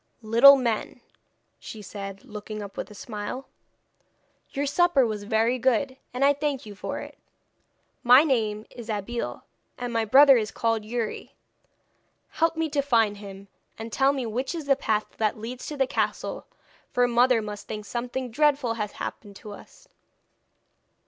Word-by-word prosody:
'Little 235 +6 +8
men,' 235 -5 -2 0.6
she 215 -1 -9
said, 195 -1 -8
looking 210 0 -7
up 200 - -10
with - - -5
a 210 - -12
smile, 210 +5 -6 1.0
'your 280 +1 -2
supper 290 -2 +3
was 210 -2 -4
very 225 +3 +1
good, 260 +2 +1 0.2
and 255 +2 +1
I 285 - +5
thank 285 -3 -3
you 210 - -9
for 200 - -5
it. - - -11 0.8
My 250 +4 +7
name 220 -7 0
is 235 -2 -10
Abeille, 220 +3 -4 0.3
and 245 -1 -4
my 225 -1 +1
brother 270 +4 +7
is 215 -2 -1
called 225 +1 -1
Youri. 230 0 -4 0.9
Help 330 0 +1
me 325 0 0
to 290 -1 +1
find 225 -7 +2
him, 200 -1 -10 0.3
and 225 0 -7
tell 270 +1 +4
me 270 -3 -3
which 250 +8 -3
is 320 -3 -5
the 275 -1 +4
path 215 -5 0
that 215 -1 0
leads 240 +4 -7
to 300 - -6
the 270 - +3
castle, - - -3 0.4
for 245 0 +2
mother 245 0 +4
must 210 -1 -7
think 210 -1 -6
something 245 +2 -4
dreadful 280 -2 +2
has 210 -2 -4
happened 205 -2 -7
to 210 +1 -10
us!' 205 - -14
235 Hz, 160 wpm, -26 LUFS, 215-270 Hz, 1.0 s, Little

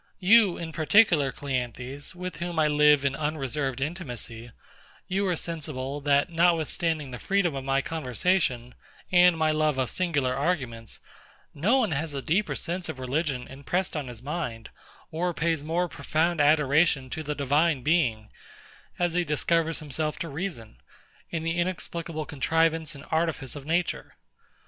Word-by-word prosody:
You, 200 0 +5
in 165 -1 -5
particular, 160 -3 +4
CLEANTHES, 130 +3 -4
with 180 -2 -6
whom 170 0 -4
I 155 -1 +4
live 150 -1 +4
in 135 -1 +1
unreserved 140 -3 -2
intimacy; 125 -7 -5 0.6
you 195 +2 0
are 180 - +1
sensible, 145 -4 -5
that 145 +3 +2
notwithstanding 165 -3 +1
the 125 - -7
freedom 195 -5 +1
of 135 -1 -4
my 135 0 +1
conversation, 130 -4 0 0.4
and 180 -2 +6
my 160 -1 +2
love 155 -2 +1
of 130 -2 0
singular 145 -8 0
arguments, 130 - -2 0.5
no 205 - +2
one 260 - +1
has 150 0 -2
a 135 - -2
deeper 195 +6 +1
sense 175 +1 -3
of - - -5
religion 130 0 -2
impressed 155 +8 -2
on 145 -4 -3
his 120 -1 -9
mind, 135 -7 -4 0.4
or 170 +1 -1
pays 165 -2 0
more 170 +3 0
profound 165 0 0
adoration 150 -1 +3
to 160 - -3
the 150 -1 -3
Divine 145 0 +2
Being, 120 -10 +1 0.7
as 175 -1 +1
he 175 0 +2
discovers 165 +1 0
himself 155 +1 -2
to 165 - -4
reason, 140 - -5 0.5
in 165 -2 -3
the 165 +1 -1
inexplicable 170 -3 -3
contrivance 160 +2 0
and 140 +1 -11
artifice 160 -5 -1
of 145 0 -9
nature. 170 +2 -1
155 Hz, 150 wpm, -27 LUFS, 135-170 Hz, 0.7 s, and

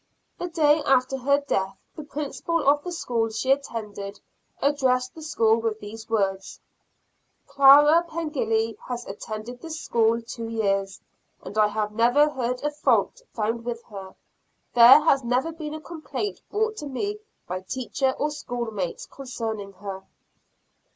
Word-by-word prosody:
The 355 - -3
day 310 -2 +3
after 260 0 +2
her 280 +2 +2
death, 195 -8 -2 0.2
the - - -6
principal 295 +2 -3
of 290 +1 +4
the 355 - -5
school 235 -9 -1
she 225 +4 -1
attended 210 -7 -3 0.4
addressed 260 -3 +1
the 320 - -11
school 225 -8 +2
with 225 -1 -2
these 220 +2 -9
words 195 -3 -1 0.9
"Clara 290 +4 +7
Pengilly 225 -9 -1
has 245 -1 -4
attended 215 +4 -7
this 320 -1 -6
school 230 -3 +2
two 230 0 -7
years, 195 -3 -1 0.4
and - - -8
I 215 -1 +4
have 210 0 -2
never 240 +7 +4
heard 250 -2 -3
a 295 - 0
fault 300 +10 +1
found 230 +1 -1
with 235 0 -5
her; 195 -2 -9 0.6
there 245 +5 +9
has 275 -4 +3
never 250 +7 0
been 310 -2 -6
a - - -6
complaint 335 +5 -5
brought 435 +1 -1
to 295 - -5
me 405 +10 -3 0.3
by 185 +1 -4
teacher 260 +6 -1
or 300 +1 -1
schoolmates 230 - -4
concerning 225 -6 -6
her." 195 0 -7
245 Hz, 145 wpm, -25 LUFS, 220-295 Hz, 0.9 s, there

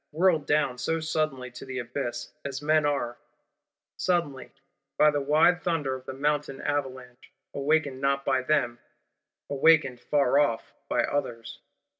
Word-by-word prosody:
Whirled 160 -2 +2
down 140 -4 +1
so 165 +5 -1
suddenly 155 -5 -2
to 120 - -10
the 130 -1 -6
abyss; 120 -1 -4
as 140 -1 -4
men 155 0 +2
are, 120 -4 -2 0.8
suddenly, 165 -8 -1 0.5
by 150 0 +6
the 145 -1 -1
wide 155 +5 +3
thunder 165 -7 -1
of 130 0 -8
the 130 - -5
Mountain 145 0 -1
Avalanche, 130 -3 -4 0.2
awakened 140 -2 0
not 140 0 0
by 130 -1 +2
them, 125 -4 0 0.7
awakened 140 -3 +3
far 140 -1 +2
off 115 -6 0 0.2
by - - +2
others! 120 -5 -3
140 Hz, 140 wpm, -27 LUFS, 130-150 Hz, 0.8 s, by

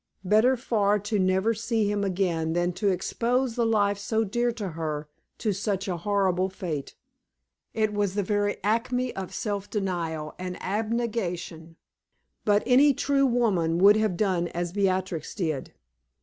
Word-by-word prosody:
Better 220 +7 +4
far 210 -4 +1
to 210 +1 -2
never 190 +4 +2
see 225 -1 0
him 205 -1 -1
again 175 -4 0
than 175 +1 0
to 200 +4 -1
expose 235 +7 0
the 235 -1 +1
life 205 -2 +2
so 220 +2 0
dear 240 +4 0
to 210 -5 -4
her 155 -2 -4 0.3
to 215 -3 0
such 195 0 -2
a 180 -2 -2
horrible 190 0 +1
fate! 170 -7 -5 0.8
It 215 -1 +1
was 205 -2 0
the 205 - +1
very 205 +1 0
acme 245 +4 0
of 190 -1 -5
self 205 -2 -3
denial 170 -6 -3
and 180 0 -5
abnegation; 195 -6 -3 0.7
but 205 0 +3
any 275 +2 +5
true 275 +1 +2
woman 200 -10 +1
would 200 +3 +7
have 215 -5 0
done 185 -4 +1
as 175 0 -3
Beatrix 190 -4 -1
did. 155 -7 -2
200 Hz, 150 wpm, -26 LUFS, 180-220 Hz, 0.8 s, would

